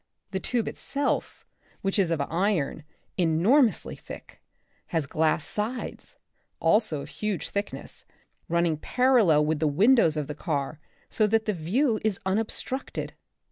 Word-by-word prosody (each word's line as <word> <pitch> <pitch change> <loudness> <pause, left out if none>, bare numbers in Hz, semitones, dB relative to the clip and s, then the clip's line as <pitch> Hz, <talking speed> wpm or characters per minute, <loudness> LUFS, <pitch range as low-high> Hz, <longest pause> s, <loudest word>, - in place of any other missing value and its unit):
The 190 - -1
tube 235 +3 -1
itself, 285 0 -2 0.4
which 195 +1 0
is 185 -4 +3
of 165 -2 0
iron, 165 -1 0 0.3
enormously 195 - +3
thick, - - -11 0.5
has 165 -4 -1
glass 155 +1 +1
sides, 220 +4 -4 0.4
also 165 -3 +2
of 145 - -10
huge 205 +5 -3
thickness, 200 +1 -5 0.4
running 170 -2 +2
parallel 220 - +3
with 155 0 0
the 155 - +2
windows 180 - +4
of 150 - -1
the 150 - -5
car 145 -2 -3 0.3
so 215 - +2
that 220 +1 +2
the 215 - +1
view 215 - +1
is 215 -4 0
unobstructed. 225 +6 -2
190 Hz, 135 wpm, -27 LUFS, 155-220 Hz, 0.5 s, windows